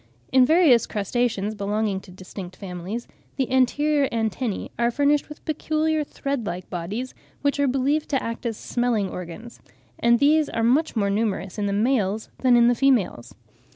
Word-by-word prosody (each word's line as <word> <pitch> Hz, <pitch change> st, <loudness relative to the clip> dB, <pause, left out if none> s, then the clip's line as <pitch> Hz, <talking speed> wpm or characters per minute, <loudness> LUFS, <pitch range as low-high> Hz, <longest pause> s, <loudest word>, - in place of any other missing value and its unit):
In 255 Hz, -1 st, +5 dB
various 315 Hz, -8 st, +5 dB
crustaceans, 215 Hz, 0 st, -1 dB
belonging 205 Hz, -1 st, -1 dB
to 195 Hz, -, -16 dB
distinct 185 Hz, 0 st, -9 dB
families, 190 Hz, +4 st, -6 dB, 0.3 s
the 265 Hz, -2 st, -1 dB
anterior 280 Hz, +3 st, +2 dB
antennae 225 Hz, -1 st, -2 dB
are 235 Hz, 0 st, +3 dB
furnished 285 Hz, +4 st, +1 dB
with 300 Hz, -, -12 dB
peculiar 310 Hz, 0 st, 0 dB
thread 275 Hz, -5 st, -4 dB
like 175 Hz, +1 st, -5 dB
bodies, 200 Hz, +9 st, -4 dB, 0.3 s
which 285 Hz, 0 st, +1 dB
are 285 Hz, -, +3 dB
believed 275 Hz, +4 st, 0 dB
to 270 Hz, -3 st, 0 dB
act 230 Hz, +1 st, -4 dB
as 225 Hz, -2 st, -3 dB
smelling 240 Hz, -5 st, -1 dB
organs, 180 Hz, +7 st, -8 dB, 0.4 s
and 235 Hz, 0 st, +4 dB
these 295 Hz, +3 st, +3 dB
are 225 Hz, -, -2 dB
much 270 Hz, +7 st, +2 dB
more 200 Hz, -3 st, +1 dB
numerous 200 Hz, -2 st, -2 dB
in 205 Hz, -, 0 dB
the -, -, -1 dB
males 215 Hz, -1 st, 0 dB
than 255 Hz, -2 st, +4 dB
in 235 Hz, 0 st, +5 dB
the 245 Hz, -, +5 dB
females. 240 Hz, -, +1 dB
235 Hz, 165 wpm, -24 LUFS, 200-275 Hz, 0.4 s, In